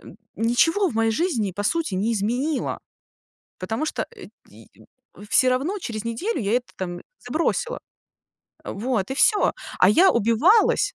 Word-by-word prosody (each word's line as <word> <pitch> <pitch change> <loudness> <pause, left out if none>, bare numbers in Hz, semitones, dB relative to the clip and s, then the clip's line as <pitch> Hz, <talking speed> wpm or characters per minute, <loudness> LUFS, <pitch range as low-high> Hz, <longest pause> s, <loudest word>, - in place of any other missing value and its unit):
н - - -13 0.2
ничего 325 - +2
в 230 - -7
моей 225 0 +2
жизни 235 - -1
по 205 +3 -4
сути 320 - -1
не 215 +5 0
изменила. 245 +8 -1 0.8
Потому 220 +11 -3
что, - - -3
э, - - -11 0.2
й - - -17 0.6
всё 255 - +4
равно 300 +11 -1
через 220 -8 -5
неделю 345 - -2
я 200 - -1
это 250 - -9
там 175 -2 -5 0.3
забросила. 335 - -1 0.9
Вот 220 0 -2
и - - -1
всё, 415 - +3 0.3
а 185 - +6
я 365 - +5
убивалась. 310 - +3
245 Hz, 150 wpm, -23 LUFS, 215-335 Hz, 0.9 s, а